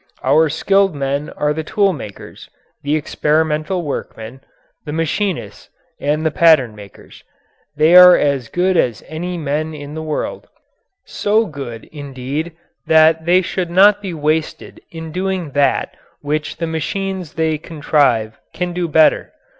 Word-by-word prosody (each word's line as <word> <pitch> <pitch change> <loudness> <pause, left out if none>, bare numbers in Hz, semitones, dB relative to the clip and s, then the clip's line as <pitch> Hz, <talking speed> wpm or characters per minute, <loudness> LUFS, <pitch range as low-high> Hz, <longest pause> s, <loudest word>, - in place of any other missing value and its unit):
Our 160 0 +3
skilled 195 +2 +1
men 140 +1 -2
are 150 0 0
the 160 +1 -4
tool 200 +3 +1
makers, 110 - -10 0.3
the 145 +2 0
experimental 155 +3 0
workmen, 130 -4 -6 0.4
the 150 - -6
machinists, 165 +4 -3 0.3
and 150 +2 -1
the 160 - +2
pattern 155 -8 +4
makers. 100 -1 -14 0.5
They 155 +3 +4
are 180 0 +9
as 140 -5 -1
good 180 +4 +1
as 120 -8 0
any 175 +3 -5
men 155 0 -3
in 145 0 -9
the 160 - -5
world 155 -1 -4 0.6
so 215 +2 0
good, 135 - -8
indeed, 145 +2 -5 0.3
that 160 0 +4
they 180 +2 +4
should 180 0 -3
not 200 +4 +5
be 195 -3 -5
wasted 155 +1 -2
in 160 -1 -8
doing 185 -2 -3
that 140 0 0 0.3
which 150 +1 -3
the 165 - -2
machines 180 +2 -4
they 160 -1 0
contrive 145 -9 0
can 180 0 -3
do 175 -1 -2
better. 155 0 +3
155 Hz, 140 wpm, -18 LUFS, 145-175 Hz, 0.6 s, are